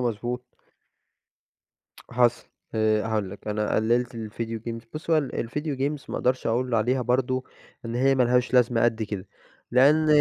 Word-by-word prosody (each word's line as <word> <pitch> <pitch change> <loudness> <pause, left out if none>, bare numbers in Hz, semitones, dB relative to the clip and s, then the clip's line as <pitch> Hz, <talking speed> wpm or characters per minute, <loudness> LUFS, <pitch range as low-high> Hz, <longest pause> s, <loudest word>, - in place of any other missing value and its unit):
مضبوط. 120 +1 -2 1.7
حصل، 120 -1 +2 0.3
آآ، 110 -1 +2
هاقول 105 -4 -1
لك 100 +2 -9
أنا 105 0 -1
قلِّلت 120 +3 +1
ال 110 -2 -6
video 115 0 -4
games، 115 0 -5
بُص 155 +2 -5
هوال 155 -5 +2
ال 115 - -2
video 150 0 -3
games 140 +1 -2
ما - - -3
أقدرش 130 +1 0
أقول 120 +2 0
عليها 125 +4 +2
برضه 130 +1 0 0.4
إن 115 0 -4
هي 135 +2 +3
ما 130 - +3
لهاش 125 +1 +2
لازمة 120 -2 +4
قد 115 -1 +1
كده، 100 -3 -5 0.4
لأن 145 +5 +5
120 Hz, 165 wpm, -25 LUFS, 115-130 Hz, 1.7 s, لأن